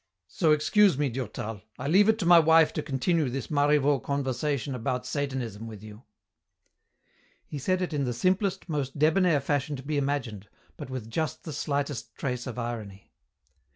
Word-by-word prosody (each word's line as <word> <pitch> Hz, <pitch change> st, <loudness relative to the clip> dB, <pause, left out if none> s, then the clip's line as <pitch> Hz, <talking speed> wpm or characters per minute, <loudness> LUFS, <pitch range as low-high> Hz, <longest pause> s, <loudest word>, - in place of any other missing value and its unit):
So 155 Hz, -, +1 dB
excuse 165 Hz, +3 st, +4 dB
me, 145 Hz, -1 st, +1 dB
Durtal. 110 Hz, -4 st, -5 dB, 0.2 s
I -, -, -4 dB
leave 195 Hz, +7 st, +5 dB
it 220 Hz, -, +4 dB
to 200 Hz, -, -3 dB
my 175 Hz, 0 st, +8 dB
wife 160 Hz, 0 st, +5 dB
to 155 Hz, -, -2 dB
continue 150 Hz, +2 st, 0 dB
this 130 Hz, 0 st, -5 dB
Marivaux 145 Hz, -1 st, +3 dB
conversation 140 Hz, +1 st, -2 dB
about 125 Hz, +1 st, -2 dB
Satanism 130 Hz, -7 st, -3 dB
with 110 Hz, -2 st, -10 dB
you." 110 Hz, +3 st, -12 dB, 1.4 s
He 145 Hz, -, -6 dB
said 185 Hz, +6 st, 0 dB
it 175 Hz, -, -4 dB
in 140 Hz, -2 st, 0 dB
the 125 Hz, -, -1 dB
simplest, 185 Hz, -, 0 dB
most 145 Hz, -4 st, -3 dB
debonair 160 Hz, +1 st, +3 dB
fashion 145 Hz, +1 st, -1 dB
to 135 Hz, -, -8 dB
be 145 Hz, +1 st, -1 dB
imagined, 125 Hz, -8 st, -3 dB, 0.3 s
but -, -, -8 dB
with 130 Hz, -4 st, -5 dB
just 155 Hz, +3 st, -2 dB
the 155 Hz, -, -6 dB
slightest 140 Hz, -5 st, -3 dB
trace 125 Hz, -2 st, -3 dB
of 125 Hz, -, -6 dB
irony. 110 Hz, -5 st, -6 dB
140 Hz, 170 wpm, -27 LUFS, 125-155 Hz, 1.4 s, my